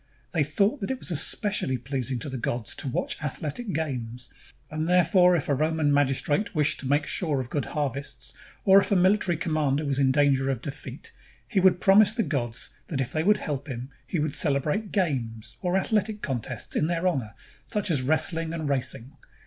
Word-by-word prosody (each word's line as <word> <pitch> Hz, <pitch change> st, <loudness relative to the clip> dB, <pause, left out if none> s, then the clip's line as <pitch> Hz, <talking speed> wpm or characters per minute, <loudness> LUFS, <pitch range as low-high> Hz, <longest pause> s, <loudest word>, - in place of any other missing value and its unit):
They 160 Hz, -4 st, +3 dB
thought 200 Hz, -, +1 dB
that 195 Hz, -, -3 dB
it 265 Hz, -, -1 dB
was 185 Hz, -, -4 dB
especially 170 Hz, -, +2 dB
pleasing 130 Hz, +1 st, -3 dB
to -, -, -3 dB
the 130 Hz, -1 st, -5 dB
gods 120 Hz, -1 st, -3 dB
to 145 Hz, -, -5 dB
watch 130 Hz, -, -2 dB
athletic 155 Hz, -, -4 dB
games; 125 Hz, -7 st, -4 dB, 0.4 s
and 155 Hz, +2 st, -2 dB
therefore 180 Hz, 0 st, +5 dB
if 160 Hz, -, -1 dB
a 145 Hz, -, +2 dB
Roman 155 Hz, +1 st, +1 dB
magistrate 145 Hz, +7 st, +1 dB
wished 150 Hz, -1 st, +1 dB
to 135 Hz, -, -4 dB
make 145 Hz, +2 st, +2 dB
sure 150 Hz, -4 st, 0 dB
of 125 Hz, -2 st, -5 dB
good 145 Hz, -, -1 dB
harvests, 140 Hz, -2 st, -3 dB, 0.3 s
or 195 Hz, 0 st, +7 dB
if -, -, -4 dB
a -, -, +4 dB
military 185 Hz, -1 st, +3 dB
commander 155 Hz, -3 st, 0 dB
was 140 Hz, -1 st, 0 dB
in 135 Hz, -1 st, +4 dB
danger 135 Hz, -1 st, +3 dB
of 135 Hz, -4 st, -1 dB
defeat, 140 Hz, -, -8 dB, 0.4 s
he 210 Hz, -, +1 dB
would 185 Hz, -1 st, +4 dB
promise 205 Hz, +3 st, +6 dB
the 225 Hz, -, 0 dB
gods 120 Hz, -, -3 dB, 0.2 s
that 145 Hz, -, -3 dB
if 130 Hz, -1 st, -2 dB
they 155 Hz, -, 0 dB
would 210 Hz, +3 st, +4 dB
help 145 Hz, -5 st, -4 dB
him, 130 Hz, 0 st, -6 dB, 0.2 s
he 180 Hz, -, -2 dB
would 150 Hz, -2 st, -1 dB
celebrate 150 Hz, +8 st, 0 dB
games, 125 Hz, -, -2 dB
or 180 Hz, 0 st, +1 dB
athletic 210 Hz, +1 st, 0 dB
contests, 125 Hz, -6 st, -3 dB
in 155 Hz, -, +2 dB
their 170 Hz, +1 st, 0 dB
honor, 125 Hz, -, -2 dB, 0.3 s
such 205 Hz, -3 st, -1 dB
as 145 Hz, -5 st, +2 dB
wrestling 160 Hz, +3 st, 0 dB
and 160 Hz, -2 st, -3 dB
racing. 130 Hz, -2 st, -2 dB
150 Hz, 195 wpm, -26 LUFS, 135-180 Hz, 0.4 s, or